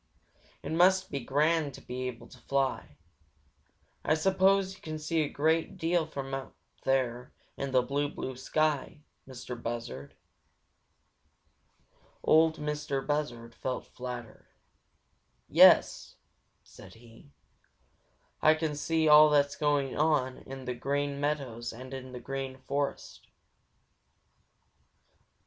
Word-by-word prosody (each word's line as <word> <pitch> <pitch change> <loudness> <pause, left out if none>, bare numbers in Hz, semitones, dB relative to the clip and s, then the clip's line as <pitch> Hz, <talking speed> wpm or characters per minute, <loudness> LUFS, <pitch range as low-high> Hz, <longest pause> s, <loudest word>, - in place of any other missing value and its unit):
It - - -5
must 185 +3 +3
be 140 - -2
grand 145 +2 +1
to - - -12
be 130 +1 -5
able 120 -2 -7
to 125 - -15
fly. 135 - -2 1.1
I 155 - +2
suppose 190 +3 +2
you - - -17
can 155 -1 -5
see 155 +2 -1
a 150 - -1
great 160 +3 0
deal 165 -1 +1
from 140 -3 -6
way 135 - -1
up 135 - -12 0.3
there 125 -2 0 0.2
in 140 - -4
the 130 -1 +3
blue, 145 +2 -1
blue 130 -2 -6
sky, 150 +2 -1 0.2
Mistah 130 -1 -7
Buzzard." 115 - -6 2.1
Ol' 160 +1 +5
Mistah 150 -2 -3
Buzzard 120 -6 -3
felt 130 +2 -4
flattered. 125 -2 -8 1.0
"Yes," - - +5 0.5
said - - -15
he, 115 +3 -17 1.1
"Ah 155 +1 +6
can 155 -1 -2
see 160 +2 0
all 150 0 +8
that's 145 -1 +2
going 145 -3 0
on 145 -4 +1
on 135 -1 -7
the 125 - -2
Green 140 +2 -2
Meadows 135 -6 -2
and 130 +3 -10
in 130 -1 -7
the 125 - -7
Green 135 +1 -5
Forest." 140 +2 -4
140 Hz, 125 wpm, -30 LUFS, 130-155 Hz, 2.1 s, all